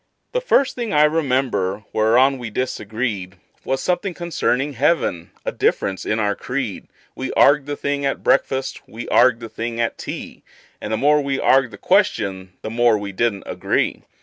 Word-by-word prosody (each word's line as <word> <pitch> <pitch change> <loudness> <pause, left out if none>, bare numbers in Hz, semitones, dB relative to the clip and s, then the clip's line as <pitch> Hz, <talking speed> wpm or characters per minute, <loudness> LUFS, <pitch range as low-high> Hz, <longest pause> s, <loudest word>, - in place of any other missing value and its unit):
The - - -1
first 280 - +3
thing 235 -3 -4
I 150 0 +5
remember 130 - +1
whereon 125 +5 +3
we 120 -2 -5
disagreed 110 -4 -3 0.3
Was 135 0 -2
something 180 0 -1
concerning 150 -5 -1
heaven 130 - 0 0.2
a - - -1
difference 95 -1 -1
in 105 - +1
our 105 -1 +1
creed; 125 -4 -4 0.3
We - - -4
arg'ed 145 -1 +5
the 145 - -2
thing 140 0 -2
at 135 - -1
breakfast, 135 0 +1
we 115 +2 -8
arg'ed 120 -1 +5
the 115 - -6
thing 115 +2 -4
at 115 - -1
tea, - - -7 0.4
And 105 - -5
the 110 - +1
more 150 +3 +4
we 140 -1 -1
arg'ed 135 -1 +3
the 105 - -11
question 95 -2 +1
the 110 - -4
more 120 -1 +3
we 100 -1 -5
didn't 100 0 -1
agree. - - -1
125 Hz, 175 wpm, -21 LUFS, 110-140 Hz, 0.4 s, I